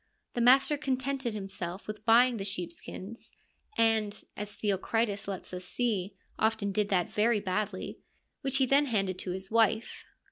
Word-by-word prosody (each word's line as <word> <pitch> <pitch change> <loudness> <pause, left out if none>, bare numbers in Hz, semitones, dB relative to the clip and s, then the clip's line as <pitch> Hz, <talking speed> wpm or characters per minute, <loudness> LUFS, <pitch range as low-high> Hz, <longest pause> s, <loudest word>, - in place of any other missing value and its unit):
The 240 - -1
master 270 +5 +6
contented 265 -3 -1
himself 195 -2 -5
with 215 0 -7
buying 240 +1 +6
the 195 - -3
sheep 180 -3 -3
skins 200 +6 -7 0.2
— - - -24
and, 220 -2 +2
as 210 0 -5
Theocritus 205 +1 -1
lets 190 -2 -6
us 180 0 -5
see, 200 -3 -1 0.2
often 220 -2 +1
did 205 +1 0
that 180 -3 +1
very 215 +1 +3
badly 200 0 -3 0.2
— - - -49
which 270 -2 +1
he 265 - +4
then 280 +3 +4
handed 195 -6 0
to - - -4
his 190 +2 -5
wife. 225 0 +2
215 Hz, 170 wpm, -30 LUFS, 195-235 Hz, 0.2 s, master